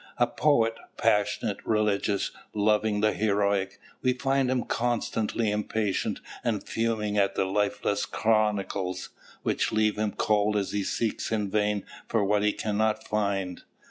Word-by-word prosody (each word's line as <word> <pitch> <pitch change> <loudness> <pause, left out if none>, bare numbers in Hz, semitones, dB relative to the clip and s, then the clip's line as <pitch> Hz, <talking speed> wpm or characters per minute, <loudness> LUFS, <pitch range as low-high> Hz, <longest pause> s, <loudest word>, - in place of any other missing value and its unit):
A 120 - +4
poet, 120 -3 +2 0.2
passionate, 105 -2 +1
religious, 105 -2 +1 0.2
loving 105 0 +2
the 110 0 +3
heroic, 100 -2 +1 0.2
we 130 -1 +2
find 135 0 +1
him 130 -1 +1
constantly 115 -2 0
impatient 105 -1 -1 0.2
and - - -1
fuming 110 -2 0
at 100 -1 +2
the - - +1
lifeless 105 +1 0
chronicles, 100 -4 0 0.3
which - - 0
leave 110 -1 +1
him 105 -2 0
cold 105 0 +2
as 100 -2 -1
he 105 -1 -1
seeks 115 +3 -2
in 105 -3 -1
vain 105 -1 +1 0.2
for 110 -3 +1
what 105 +1 +2
he 105 0 +3
cannot 110 +1 -1
find. 100 -4 -1
105 Hz, 140 wpm, -27 LUFS, 100-110 Hz, 0.3 s, A